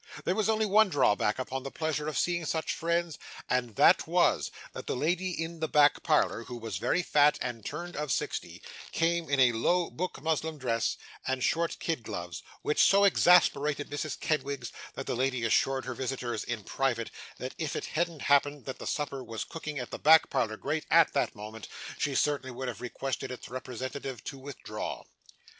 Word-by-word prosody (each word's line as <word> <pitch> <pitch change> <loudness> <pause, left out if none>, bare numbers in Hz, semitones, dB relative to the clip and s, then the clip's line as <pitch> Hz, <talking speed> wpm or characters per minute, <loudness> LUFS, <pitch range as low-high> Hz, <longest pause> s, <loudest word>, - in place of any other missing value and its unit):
There 180 - +2
was 215 +2 +1
only 220 0 +2
one 210 +1 +5
drawback 105 - +2
upon 130 +1 -3
the 135 - -5
pleasure 155 0 -2
of 155 - -2
seeing 175 -1 +1
such 160 +1 -1
friends, 170 -1 -1 0.3
and 125 -4 0
that - - +5
was, - - +3 0.2
that - - -8
the - - -1
lady 175 +7 0
in 165 -1 -4
the 160 - 0
back 150 -1 +4
parlour, 150 -7 +2
who 125 - -7
was 115 -5 -4
very 175 - +1
fat, 150 -2 +4
and 120 -3 -4
turned 175 +8 -5
of 150 -2 -2
sixty, - - -3 0.3
came 165 -1 +1
in 140 -1 +2
a 130 -2 +6
low 170 +10 +1
book 180 +2 -4
muslin 160 0 -1
dress 115 -4 0 0.3
and 130 -1 0
short 170 0 +1
kid 165 -6 -2
gloves, 90 -5 -6 0.2
which 150 - +2
so 200 0 +6
exasperated 150 -6 +4
Mrs 145 0 -3
Kenwigs, 140 -5 -2 0.2
that - - -5
that - - -2
lady 130 -1 0
assured 130 +3 +2
her 130 - -3
visitors, 120 -3 -3
in 120 -4 -4
private, 120 0 -1 0.3
that 130 - -5
if 160 -3 -2
it - - -3
hadn't 165 -2 -2
happened 145 0 +3
that 130 - -6
the - - -6
supper 140 -3 -2
was 115 -2 -4
cooking 155 -2 -6
at 125 -2 -5
the - - -5
back 160 +1 +6
parlour 110 -2 0
grate 155 +5 -2
at 165 0 +5
that - - 0
moment, 105 0 -8 0.3
she 140 -2 0
certainly 145 -2 +1
would 130 +1 -5
have 120 -4 -5
requested 130 +2 -3
its 125 - -8
representative 130 0 -5
to 135 - -7
withdraw. 140 0 -6
140 Hz, 190 wpm, -30 LUFS, 125-160 Hz, 0.3 s, a